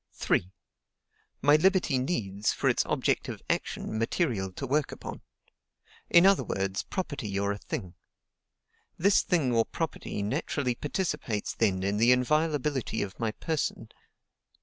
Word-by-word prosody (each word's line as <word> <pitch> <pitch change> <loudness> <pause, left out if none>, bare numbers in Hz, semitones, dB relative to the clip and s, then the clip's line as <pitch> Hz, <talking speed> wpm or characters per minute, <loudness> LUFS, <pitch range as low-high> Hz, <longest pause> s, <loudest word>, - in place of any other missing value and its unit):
"3. 90 - 0 0.9
My 145 +2 +6
liberty 180 -5 +3
needs, 105 - -1
for - - -1
its - - +3
objective - - 0
action, 110 - -2
material 115 - 0
to 135 - -5
work 145 +2 0
upon; - - -8 0.9
in 170 +1 +7
other 195 0 +5
words, 95 0 -2
property 145 - -4
or 100 0 0
a 100 - -3
thing. 90 -2 -5 1.0
This 195 +3 +4
thing 145 -9 +1
or 115 -1 +4
property 150 -8 -4
naturally 130 +2 -1
participates 150 - -2
then 95 -4 +1
in 100 +1 0
the 115 +3 +5
inviolability 145 0 +1
of 95 -3 -8
my 115 -2 0
person. 160 +3 -3
125 Hz, 130 wpm, -28 LUFS, 100-155 Hz, 1.0 s, in